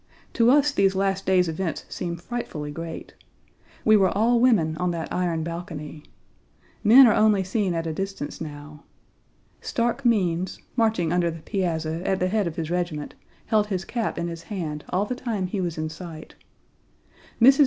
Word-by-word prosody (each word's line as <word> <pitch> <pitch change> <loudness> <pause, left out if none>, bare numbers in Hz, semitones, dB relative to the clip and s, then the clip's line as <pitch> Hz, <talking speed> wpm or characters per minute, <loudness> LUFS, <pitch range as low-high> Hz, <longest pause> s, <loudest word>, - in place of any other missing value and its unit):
To 235 -1 +4
us 290 +2 +5
these 195 -6 +2
last 195 0 0
days' 185 -2 +4
events 165 0 -3
seem 170 -1 -4
frightfully 170 -7 -5
great. 165 +2 -7 0.7
We 215 - +7
were 195 -3 +4
all 230 +5 +2
women 205 -11 +3
on 180 +1 0
that 165 -2 -4
iron 170 -3 0
balcony. 160 -3 -6 0.8
Men 245 +5 +9
are 225 - +5
only 215 -2 +4
seen 190 -1 -1
at 165 0 -2
a 160 - -2
distance 195 -4 -5
now. 150 -1 -8 0.8
Stark 240 +3 -1
Means, 185 -7 +1 0.2
marching 220 -8 +1
under 175 -1 +2
the 165 -1 -8
piazza 165 -5 -2
at 190 0 0
the 185 - +1
head 210 -2 +1
of 165 - -5
his 165 -2 -4
regiment, 175 -4 -2 0.3
held 210 -1 +2
his 190 -2 -3
cap 235 -3 -2
in 170 - -2
his 165 -1 -6
hand 165 -6 -5
all 190 +3 +1
the 250 - -3
time 230 -6 -3
he 190 +2 -2
was 170 -3 -3
in 155 0 -2
sight. 160 0 -9 1.1
Mrs. 265 +4 +7
180 Hz, 175 wpm, -25 LUFS, 165-210 Hz, 1.1 s, Men